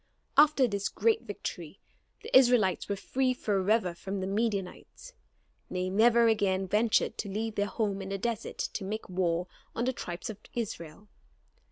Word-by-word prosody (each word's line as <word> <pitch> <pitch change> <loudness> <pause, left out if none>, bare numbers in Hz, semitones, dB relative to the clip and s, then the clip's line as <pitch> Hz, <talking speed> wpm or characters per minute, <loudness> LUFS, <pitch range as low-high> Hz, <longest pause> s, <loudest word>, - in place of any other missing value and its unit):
After 295 -3 +6
this 200 -2 -2
great 450 -1 +2
victory - - -6 0.4
the - - -2
Israelites 240 -9 +4
were 200 - 0
freed 255 +5 0
forever 200 -2 +1
from 195 +3 -5
the 190 - -2
Midianites. 205 - -3 0.6
They 185 0 -2
never 230 +3 +5
again 195 -4 +1
ventured 215 +3 +2
to 205 - -3
leave 220 +3 -2
their 205 -1 0
home 200 -2 -2
in 195 - -6
the 195 - -2
desert 230 +1 -3
to 200 - -3
make 215 +3 -4
war 175 -1 0 0.3
on 235 - -1
the 260 - 0
tribes 175 -2 -5
of 210 - -12 0.2
Israel. 200 -5 -5
205 Hz, 160 wpm, -29 LUFS, 190-235 Hz, 0.6 s, After